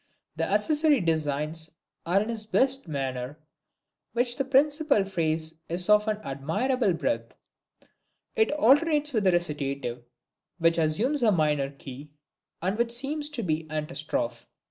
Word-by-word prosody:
The - - -1
accessory 305 -2 +3
designs 160 -1 -1 0.4
are 180 +3 +3
in 220 - -6
his 220 -2 -4
best 265 0 +2
manner, 135 -2 -4 0.8
while 245 +1 +2
the 270 - -1
principal 280 -3 +3
phrase 160 -3 -2
is 175 +3 -2
of 210 +1 +5
an 215 -1 0
admirable 195 - 0
breadth. 285 - -2 1.0
It 440 - +3
alternates 295 +2 +3
with 210 -4 +1
a - - +6
Recitative, 140 -7 -2 0.5
which 165 -1 +3
assumes 215 - +1
a 225 -3 +4
minor 150 -6 +1
key, 140 +1 -11 0.5
and 195 +5 -1
which 235 0 +1
seems 290 +4 -1
to 275 -6 -4
be 155 -4 0
its 155 - -11
Antistrophe. 150 -6 -3
180 Hz, 140 wpm, -27 LUFS, -, 1.0 s, a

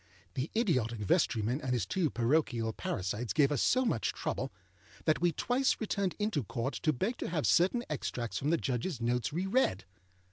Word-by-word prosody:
The 130 +4 -2
idiotic 125 - +1
vestryman 115 - +1
and 130 -3 -1
his 120 -6 0
two 170 - 0
parochial 120 -3 +1
parasites 105 +6 -3
gave 145 -2 +4
us 145 - +1
so 255 +1 +3
much 115 - 0
trouble - - -3 0.5
that 155 - +2
we 175 0 +4
twice 250 - +1
returned 200 -4 -1
into 210 - 0
Court 120 +5 -3
to 155 - +1
beg 195 - -1
to - - -4
have 165 -4 -1
certain 190 +8 +3
extracts 125 -5 -3
from 145 - -1
the 170 - +3
Judgeâs 130 +2 -2
notes 120 +1 0
re 175 +5 -1
read. 190 - +1
145 Hz, 180 wpm, -32 LUFS, 120-185 Hz, 0.5 s, gave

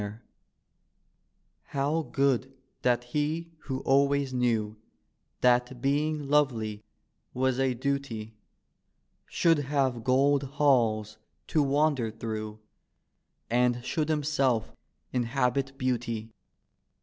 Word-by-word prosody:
D,gt,, 105 - -2
erihyGOOgle - - -6
Martin 115 - -27 1.4
How 145 +4 0
good 135 -1 +1 0.3
that 120 -1 +2
he 150 +6 -2
who 135 -1 -3
always 140 0 +2
knew 115 -4 0 0.7
That 125 0 +3
being 145 +2 0
lovely 115 -8 +1 0.5
was 130 0 +1
a 130 -2 +1
duty, 125 -4 -3 0.9
Should 165 -3 +3
have 135 -4 0
gold 135 +3 +3 0.2
halls 110 -7 +2 0.3
to 155 - +3
wander 140 -4 +2
through 110 -1 -5 0.9
And 120 +1 +1
should 155 -2 -1
himself 140 -6 +1 0.4
inhabit 130 +2 0
beauty. 115 -3 -2
130 Hz, 100 wpm, -28 LUFS, 120-140 Hz, 1.4 s, That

